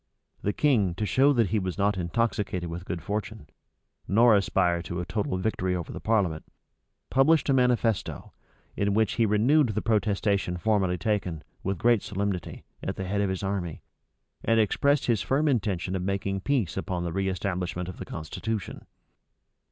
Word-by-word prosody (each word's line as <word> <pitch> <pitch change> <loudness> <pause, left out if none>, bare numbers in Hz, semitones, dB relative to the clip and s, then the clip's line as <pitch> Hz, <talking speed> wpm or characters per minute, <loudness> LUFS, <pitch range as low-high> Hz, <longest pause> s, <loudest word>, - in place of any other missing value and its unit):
The 105 - 0
king, 105 - +2
to 105 - -2
show 135 +6 +4
that 115 -8 +2
he 110 - +1
was 95 -1 -3
not 100 +1 +2
intoxicated 95 -1 -1
with 85 +2 -6
good 90 -3 -4
fortune, 105 -1 -4 0.6
nor 115 +2 +5
aspired 90 -3 +1
to 85 - -4
a 90 - -3
total 95 0 -2
victory 95 -2 -1
over 85 -2 -4
the - - -6
parliament, 95 -8 0 0.7
published 145 +4 +4
a - - +5
manifesto, 125 -4 +1 0.4
in 100 0 0
which 110 -2 +2
he 115 -2 +2
renewed 125 +7 +3
the 105 - -1
protestation 100 -4 +1
formerly 95 -1 +1
taken, 90 -4 -2 0.2
with 95 0 -2
great 120 +2 +3
solemnity, 100 -4 -3 0.2
at - - -3
the 95 - -4
head 100 +2 0
of 100 - +1
his 95 +1 -3
army, 95 -5 -3 0.6
and 115 0 +3
expressed 140 +6 +2
his 115 -5 +2
firm 145 +4 +1
intention 95 - 0
of 95 - -2
making 100 +1 -1
peace 110 - 0
upon 90 -1 -2
the 85 -1 -3
reestablishment 90 -2 -2
of 90 - -7
the - - -5
constitution. 95 +6 -5
100 Hz, 165 wpm, -27 LUFS, 90-110 Hz, 0.7 s, nor